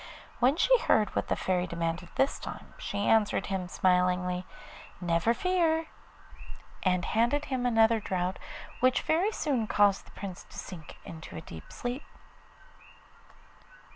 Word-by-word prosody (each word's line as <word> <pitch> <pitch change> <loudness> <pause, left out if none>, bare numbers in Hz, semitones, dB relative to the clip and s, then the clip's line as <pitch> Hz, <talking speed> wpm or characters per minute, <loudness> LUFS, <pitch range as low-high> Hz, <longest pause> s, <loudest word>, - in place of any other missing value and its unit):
When 255 +4 +4
she - - +5
heard 215 - +2
what - - 0
the - - +1
Fairy 180 -1 0
demanded 170 +1 -3
this 270 - +1
time, - - -8
she 205 - -2
answered 220 -2 +3 0.2
smilingly, 180 0 +1 0.5
'Never 170 +4 +2
fear,' 330 -1 +1 0.9
and 180 -2 +1
handed 240 +7 +1
him 255 -2 -1
another 225 -1 +4
draught, 185 -2 -2 0.4
which 255 0 +3
very 350 +7 +2
soon 265 - -1
caused 205 -2 +3
the - - -15
Prince 190 -3 -6
to - - -12
sink 160 -5 -8
into 160 - -9
a - - -5
deep 80 - -11
sleep. 245 +3 -4
205 Hz, 135 wpm, -29 LUFS, 180-255 Hz, 0.9 s, she